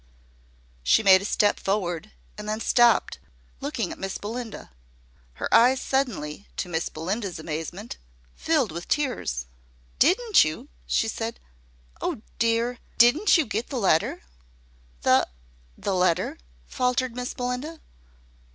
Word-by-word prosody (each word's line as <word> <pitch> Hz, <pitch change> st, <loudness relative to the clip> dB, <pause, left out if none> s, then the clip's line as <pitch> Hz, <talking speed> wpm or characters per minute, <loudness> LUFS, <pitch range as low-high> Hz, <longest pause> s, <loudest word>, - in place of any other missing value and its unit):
She 60 Hz, -, +4 dB
made 190 Hz, -2 st, +7 dB
a -, -, -5 dB
step 205 Hz, 0 st, +2 dB
forward, 195 Hz, -1 st, -2 dB, 0.3 s
and 210 Hz, 0 st, -7 dB
then 215 Hz, +1 st, -1 dB
stopped, 240 Hz, +1 st, +3 dB, 0.4 s
looking 270 Hz, -, -3 dB
at -, -, -8 dB
Miss 195 Hz, 0 st, -3 dB
Belinda. 225 Hz, -, -6 dB, 0.6 s
Her -, -, -4 dB
eyes 255 Hz, +3 st, +6 dB
suddenly, 205 Hz, -, -2 dB
to -, -, -2 dB
Miss 165 Hz, -1 st, -2 dB
Belinda's 185 Hz, +4 st, -3 dB
amazement, 165 Hz, +7 st, -6 dB, 0.4 s
filled 295 Hz, -, +1 dB
with 170 Hz, +2 st, -7 dB
tears. 245 Hz, -, -1 dB, 0.5 s
"Didn't 405 Hz, -, +5 dB
you," 155 Hz, 0 st, -4 dB, 0.2 s
she -, -, +1 dB
said, -, -, -4 dB, 0.6 s
"oh, 215 Hz, -, -3 dB, 0.2 s
dear! 230 Hz, +2 st, +1 dB, 0.2 s
Didn't 300 Hz, -, +6 dB
you 320 Hz, -, +2 dB
get 220 Hz, +1 st, -3 dB
the 270 Hz, -, -3 dB
letter?" 185 Hz, -, +1 dB, 0.8 s
"The -, -, +4 dB, 0.5 s
the 200 Hz, -, -2 dB
letter!" 180 Hz, -, +1 dB, 0.3 s
faltered 250 Hz, -1 st, -1 dB
Miss 250 Hz, 0 st, -4 dB
Belinda. 250 Hz, +6 st, -4 dB
215 Hz, 125 wpm, -25 LUFS, 180-250 Hz, 0.8 s, made